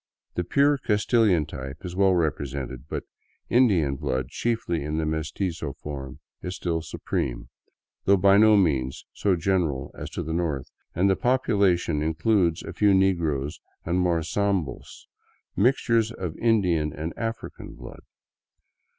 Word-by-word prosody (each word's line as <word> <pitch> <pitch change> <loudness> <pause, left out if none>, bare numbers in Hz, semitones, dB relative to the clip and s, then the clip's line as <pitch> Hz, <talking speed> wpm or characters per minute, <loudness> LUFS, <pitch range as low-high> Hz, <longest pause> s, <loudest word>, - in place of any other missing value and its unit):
The 90 - -1
pure 140 +9 +3
Castilian 105 - +2
type 65 +3 -8
is 90 0 -6
well 95 -1 +4
represented, 70 -5 -2
but - - -3 0.5
Indian 90 - +3
blood, 65 -1 -2
chiefly 110 -9 -1
in 75 +1 -2
the 80 - 0
meztizo 80 0 -3
form, 70 -3 -7 0.2
is 90 +1 -5
still 85 -2 -2
supreme, 60 -5 -3 0.6
though 100 0 +5
by 100 +1 +5
no 110 0 +6
means 70 -9 0
so 100 -3 +1
general 80 -6 0
as 75 - -7
to 85 - -1
the 80 0 -4
north, 80 -6 -1 0.3
and 90 +3 +3
the 95 - +3
population 100 - +2
includes 85 +2 +1
a - - -7
few 105 -2 +4
negroes 80 -7 +1 0.3
and 85 +2 +1
more 85 -3 +1
sambos, 95 -1 -2 0.3
— - - -42
mixtures 115 0 +2
of 90 -7 -5
Indian 90 -10 +2
and 80 +3 -5
African 115 0 -5
blood. - - -11
85 Hz, 140 wpm, -25 LUFS, 75-100 Hz, 0.6 s, no